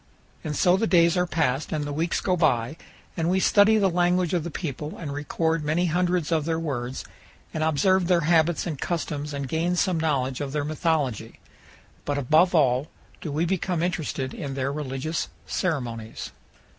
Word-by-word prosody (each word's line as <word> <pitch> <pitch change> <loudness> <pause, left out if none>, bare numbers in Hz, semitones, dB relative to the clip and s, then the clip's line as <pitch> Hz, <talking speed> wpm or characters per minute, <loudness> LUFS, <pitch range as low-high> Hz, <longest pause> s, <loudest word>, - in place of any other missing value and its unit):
And 150 -1 -3
so 180 +5 +4
the 225 +3 0
days 170 -2 +4
are 180 0 +1
passed 150 -4 0
and 155 -2 -1
the 145 - -4
weeks 165 +4 -1
go 185 - +1
by, 125 -5 +1 0.4
and 165 0 0
we 190 +1 +2
study 205 +3 +5
the 200 -2 +3
language 180 0 +1
of 175 -3 +1
the 170 - -4
people 150 -2 -5
and 150 -4 -5
record 160 +2 -1
many 155 +4 +1
hundreds 175 -1 0
of 155 -3 +1
their 165 0 0
words 130 -5 -4 0.5
and 155 - -1
observe 175 +4 +2
their 175 -2 +3
habits 165 +1 +2
and 155 -6 -4
customs 150 -4 -3
and 140 -1 -4
gain 165 +5 0
some 180 -2 +1
knowledge 135 -5 0
of 140 -1 -4
their 150 -1 -1
mythology, 150 - -1 0.6
but 145 0 -2
above 155 +7 +3
all 135 -2 +3 0.3
do 155 - -4
we 155 +4 0
become 180 -1 -1
interested 155 -7 -2
in 135 -2 -5
their 135 +1 -1
religious 145 +2 -3 0.2
ceremonies. 120 -10 -3
160 Hz, 180 wpm, -25 LUFS, 145-175 Hz, 0.6 s, study